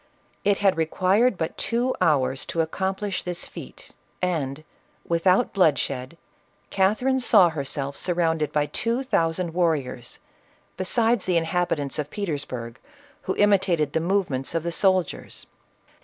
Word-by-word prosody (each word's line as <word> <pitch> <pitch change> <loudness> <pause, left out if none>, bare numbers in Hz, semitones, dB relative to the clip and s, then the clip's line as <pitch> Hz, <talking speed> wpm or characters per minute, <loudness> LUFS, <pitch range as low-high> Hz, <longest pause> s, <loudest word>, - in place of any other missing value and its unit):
It 200 -1 +3
had 195 -4 +2
required 185 +8 +2
but 160 - -4
two 245 +2 0
hours 130 -4 +2
to 165 - -4
ac 160 0 -3
complish 190 +1 -2
this 175 -1 -5
feat, - - -11 0.3
and, 155 -5 -2 0.4
without 180 +7 +2
bloodshed, 140 -5 +1 0.5
Catherine 220 +8 +2
saw 210 -7 +6
herself 140 -2 -4
surrounded 165 -4 0
by 150 -1 +1
two 235 - -2
thousand 165 -7 0
warriors, 150 -8 -1 0.6
be 185 - -4
sides 230 0 +2
the 180 -2 +2
inhabitants 165 -4 -1
of 150 -1 -3
Petersburg, 145 - -5 0.5
who - - -1
imitated 190 -7 +2
the - - +2
movements 170 -7 -1
of 165 - 0
the 170 - -2
soldiers. 185 0 0
170 Hz, 130 wpm, -24 LUFS, 150-195 Hz, 0.6 s, saw